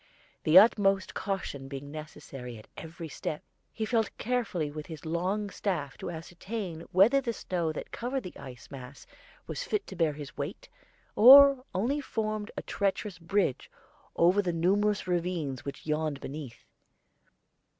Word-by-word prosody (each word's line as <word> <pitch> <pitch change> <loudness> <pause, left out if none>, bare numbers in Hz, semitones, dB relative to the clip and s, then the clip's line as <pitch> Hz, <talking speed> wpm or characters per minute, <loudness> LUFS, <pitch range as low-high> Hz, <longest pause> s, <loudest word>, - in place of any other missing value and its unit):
The 155 +3 +7
utmost 195 -2 +5
caution 185 -9 -4
being 140 +1 -7
necessary 135 -5 -8
at 110 - -14
every 160 +1 -8
step, 150 0 -5 0.3
he 220 - -3
felt 225 -2 +1
carefully 215 -11 -1
with 150 0 -7
his 160 -1 -9
long 185 +6 -1
staff 170 -9 -2
to - - -5
ascertain 175 +2 -6
whether 220 +10 +5
the 235 -3 -2
snow 175 -6 -2
that - - -7
covered 250 +2 -3
the 180 - -8
icy 125 -3 -10
mass 135 0 -10 0.4
was - - -4
fit 425 -4 -1
to 190 - -9
bear 165 -4 +2
his 145 -2 -9
weight, - - -6 0.5
or 275 +3 +9
only 255 +10 0
formed 215 -5 -3
a - - -3
treacherous 195 -1 -2
bridge 175 -4 0 0.5
over 180 +4 +4
the 180 -3 -1
numerous 200 +5 +2
ravines 170 -7 -2
which 140 - -7
yawned 155 -2 -1
beneath. 135 -5 -8
180 Hz, 150 wpm, -29 LUFS, 155-210 Hz, 0.5 s, or